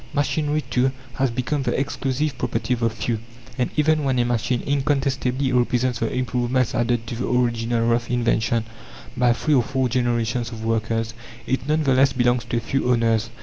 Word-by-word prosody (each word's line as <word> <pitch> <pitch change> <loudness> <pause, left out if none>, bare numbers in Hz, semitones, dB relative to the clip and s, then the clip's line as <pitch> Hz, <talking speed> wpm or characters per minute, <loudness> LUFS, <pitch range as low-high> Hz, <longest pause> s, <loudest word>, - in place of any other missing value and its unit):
Machinery, 150 +1 0
too, 130 +1 +2 0.2
has 135 -1 +1
become 130 +5 -1
the 130 - 0
exclusive 140 +1 -1
property 125 0 -1
of 120 - -2
the 115 -1 +2
few, 115 0 -2 0.4
and 125 - +1
even 155 0 +3
when 135 -2 +1
a 120 - +2
machine 120 0 0
incontestably 135 -2 0
represents 125 0 +1
the 115 - -1
improvements 125 -1 0
added 120 -1 0
to 115 - -5
the 125 - -2
original 120 -1 +1
rough 120 0 +1
invention 115 -1 +1 0.5
by 125 -1 +3
three 150 +6 +1
or 130 - +5
four 130 +1 0
generations 120 -1 0
of 110 -1 -7
workers, 115 0 -1 0.3
it 130 +1 -2
none 155 +1 +2
the 135 -2 +3
less 135 +1 +4
belongs 120 -1 +1
to 120 0 -2
a - - 0
few 130 +2 -1
owners. 115 -1 +2
125 Hz, 185 wpm, -23 LUFS, 115-135 Hz, 0.5 s, or